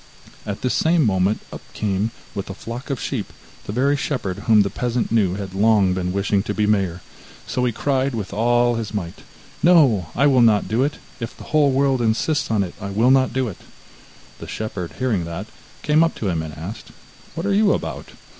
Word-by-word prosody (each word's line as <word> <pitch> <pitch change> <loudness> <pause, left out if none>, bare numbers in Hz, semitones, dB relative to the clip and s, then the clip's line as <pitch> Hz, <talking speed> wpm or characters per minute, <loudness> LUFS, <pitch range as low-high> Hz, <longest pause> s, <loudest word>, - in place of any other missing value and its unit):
At 100 -1 -5
this 125 - +1
same 160 -2 +3
moment 95 0 +1
up - - -7
came, 105 +1 -1 0.2
with 100 - -5
a 95 - -6
flock 120 +7 -7
of 135 -3 -2
sheep, - - -4 0.3
the - - -5
very 135 +6 +2
shepherd 125 -10 -3
whom 110 -2 +6
the 100 - -3
peasant 125 -1 -2
knew 100 -6 +2
had 95 -2 -6
long 100 -2 +3
been 90 -1 -2
wishing 100 +1 +1
to 105 +1 -4
be 105 - +1
mayor, 95 -4 0 0.4
so 125 - -2
he 120 - +1
cried 135 +2 0
with 105 -3 -5
all 120 +3 +3
his 110 -2 -4
might: 90 -4 -5 0.4
'No, 140 - +5
I 140 - +3
will 135 -3 +5
not 110 -3 +4
do 115 +3 0
it; 145 +2 -1 0.2
if 115 0 -6
the - - -10
whole 150 -2 +5
world 135 -1 +2
insists 145 +7 0
on 110 -3 +2
it, 90 - -6
I 100 - -4
will 110 +6 +3
not 130 -1 +4
do 130 -1 0
it!' 100 - -7 0.8
The - - -8
shepherd 100 -5 -5
hearing 120 -9 0
that, 85 +4 -5 0.4
came 150 +2 +4
up 165 - 0
to 105 - -2
him, 85 -3 -1
and 80 -1 -7
asked: 90 +8 -7 0.5
'What 165 - -3
are 200 - +1
you 205 0 +4
about? - - -3
110 Hz, 210 wpm, -21 LUFS, 100-130 Hz, 0.8 s, whom